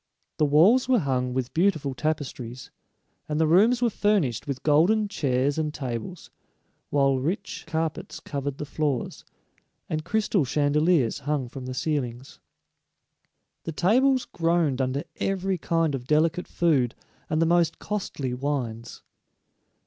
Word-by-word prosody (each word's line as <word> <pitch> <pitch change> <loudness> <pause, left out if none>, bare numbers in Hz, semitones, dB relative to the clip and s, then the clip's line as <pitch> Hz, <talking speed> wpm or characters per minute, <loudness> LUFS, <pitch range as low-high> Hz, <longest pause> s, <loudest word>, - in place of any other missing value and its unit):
The 150 - +3
walls 195 - +5
were 255 - +5
hung 130 - 0
with 130 0 -3
beautiful 160 -6 +1
tapestries, 130 -4 -4 0.6
and 150 0 -1
the 160 - +4
rooms 220 +10 +4
were 240 - +4
furnished 195 - 0
with 140 -2 -4
golden 175 +9 +3
chairs 140 -5 0
and 155 -1 -1
tables, 130 +4 -6 0.6
while 135 -2 +2
rich 185 - -3
carpets 160 -1 -3
covered 140 -1 -4
the 150 - -5
floors, 145 -3 -2 0.6
and 155 0 -3
crystal 205 -1 +1
chandeliers 145 -1 +2
hung 145 -2 -2
from 130 0 -8
the 130 - -5
ceilings. 130 -3 -3 1.3
The 165 - -4
tables 255 - +3
groaned 165 -5 0
under 130 +2 -1
every 195 -1 -1
kind 165 -2 0
of 125 -2 -5
delicate 165 +4 +2
food 140 -8 +1 0.3
and 155 - 0
the 165 - +3
most 170 -1 +2
costly 150 -11 -4
wines. 125 -4 -4
150 Hz, 135 wpm, -26 LUFS, 135-175 Hz, 1.3 s, walls